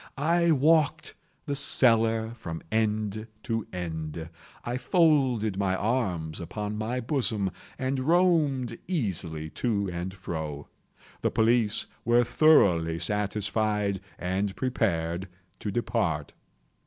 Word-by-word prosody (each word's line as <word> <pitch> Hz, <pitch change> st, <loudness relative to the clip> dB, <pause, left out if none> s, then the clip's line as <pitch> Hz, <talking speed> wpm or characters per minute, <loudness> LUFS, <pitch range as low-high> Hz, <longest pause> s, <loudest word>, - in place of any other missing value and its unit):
I 170 Hz, +4 st, +2 dB
walked 155 Hz, +1 st, +3 dB, 0.3 s
the 145 Hz, -2 st, -2 dB
cellar 115 Hz, -4 st, +3 dB
from 85 Hz, -8 st, -7 dB
end 110 Hz, -1 st, 0 dB, 0.2 s
to 115 Hz, -2 st, -2 dB
end. 80 Hz, -2 st, -5 dB, 0.4 s
I 120 Hz, +1 st, -2 dB
folded 125 Hz, -, +2 dB
my 95 Hz, -2 st, +1 dB
arms 95 Hz, -8 st, -1 dB
upon 105 Hz, +4 st, -4 dB
my 110 Hz, +4 st, -2 dB
bosom, 115 Hz, -, 0 dB, 0.3 s
and 130 Hz, 0 st, -1 dB
roamed 150 Hz, -6 st, +2 dB
easily 85 Hz, -, -2 dB
to 100 Hz, -6 st, -1 dB
and 85 Hz, +2 st, -4 dB
fro. 80 Hz, -6 st, -6 dB, 0.5 s
The -, -, +2 dB
police 115 Hz, -1 st, +2 dB, 0.2 s
were 120 Hz, +1 st, +4 dB
thoroughly 90 Hz, -, +4 dB
satisfied 105 Hz, 0 st, -1 dB, 0.2 s
and 95 Hz, +2 st, -2 dB
prepared 95 Hz, -8 st, -1 dB, 0.3 s
to 105 Hz, -, -4 dB
depart. 100 Hz, -9 st, -1 dB
110 Hz, 105 wpm, -27 LUFS, 95-125 Hz, 0.5 s, were